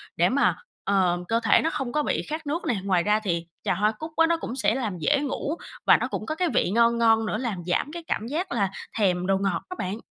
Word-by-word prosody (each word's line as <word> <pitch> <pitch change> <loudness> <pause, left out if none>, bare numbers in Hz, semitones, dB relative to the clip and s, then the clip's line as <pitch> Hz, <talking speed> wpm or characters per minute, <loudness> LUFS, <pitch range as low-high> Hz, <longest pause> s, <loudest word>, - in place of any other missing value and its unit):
để - - +3
mà, - - +2 0.3
ờ, 185 -3 +2
cơ 230 +3 +2
thể - - +5
nó 325 - +1
không 265 -6 -3
có 300 +2 +1
bị - - 0
khát 310 0 -4
nước 320 +5 -2
này. 235 - +1
Ngoài 185 -3 +2
ra 210 +2 +2
thì 170 -5 -2 0.2
trà - - +1
hoa 210 +4 +2
cúc 315 +5 -6
á 325 0 +5
nó 335 0 +2
cũng 255 -6 -5
sẽ 220 -4 +1
làm 220 -8 -2
dễ 285 - +2
ngủ 290 +2 -2 0.3
và - - +7
nó - - -2
cũng - - -4
có 310 - -3
cái 360 +2 +1
vị - - +2
ngon 235 +2 +3
ngon 225 -1 +4
nữa 210 - -1
làm 215 -7 -3
giảm 180 +11 0
cái 340 +1 -7
cảm 220 - -2
giác 335 +8 -3
là 200 -5 +1 0.3
thèm 180 -4 +1
đồ 195 0 +3
ngọt 195 -3 -1
á 365 - -5
bạn. 190 +3 -2
225 Hz, 265 wpm, -25 LUFS, 195-295 Hz, 0.3 s, và